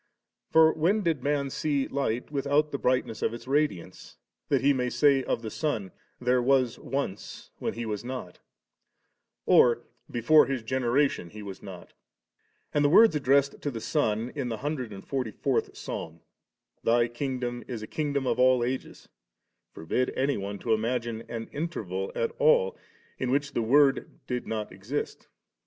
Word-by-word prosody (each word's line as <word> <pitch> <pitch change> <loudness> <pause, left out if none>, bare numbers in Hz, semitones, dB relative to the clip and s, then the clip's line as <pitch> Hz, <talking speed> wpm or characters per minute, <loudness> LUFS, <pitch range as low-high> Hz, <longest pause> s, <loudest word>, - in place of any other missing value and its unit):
for 160 0 +6
when 190 +7 +1
did 165 -6 0
man 140 0 0
see 140 -2 0
light 130 -2 -2
without 145 +1 +1
the 140 - -3
brightness 125 -3 0
of 115 - 0
its 120 - -10
radiance, 140 - -2 0.3
that - - +2
he 140 +1 +4
may 125 -2 -1
say 140 0 +3
of 115 - -2
the 110 - -5
Son, 115 -12 -2
* - - -42
There 125 0 +4
was 130 -1 +2
once, 135 -8 -5
when - - -2
He 120 0 -4
was 105 -1 -3
not,* 125 -8 -6 1.1
or 120 -1 +5
* - - -44
Before 150 +4 +6
His 130 -4 -2
generation 130 -4 +1
He 105 +2 -9
was 95 -1 -8
not' 95 -3 -10 0.8
And 145 - +2
the 145 - +4
words 205 +2 +7
addressed 140 0 +2
to 145 - -2
the 120 -5 -5
Son 115 -3 0
in 135 -4 -3
the 115 - -3
hundred 130 -3 -3
and 95 -1 -9
forty 130 -4 -2
fourth - - -1
Psalm, 80 +1 -6 0.6
*Thy 120 +1 +3
kingdom 120 -1 -3
is 115 -4 -5
a - - -6
kingdom 145 -3 -2
of 125 - 0
all 130 -1 +5
ages 130 +2 -4 0.3
*,' - - -54
forbid 125 +10 -1
any 140 +2 +1
one 100 0 -4
to 115 +2 0
ima 115 +3 +1
gine 115 -1 -6
any 115 -1 -4
interval 100 - -4
at 115 - 0
all 95 -11 +4 0.4
in 130 - -1
which 140 +2 0
the - - 0
Word 135 +4 +4 0.2
did 125 -1 -3
not 110 -2 -3
exist. 105 +10 -5
125 Hz, 175 wpm, -28 LUFS, 115-140 Hz, 1.1 s, words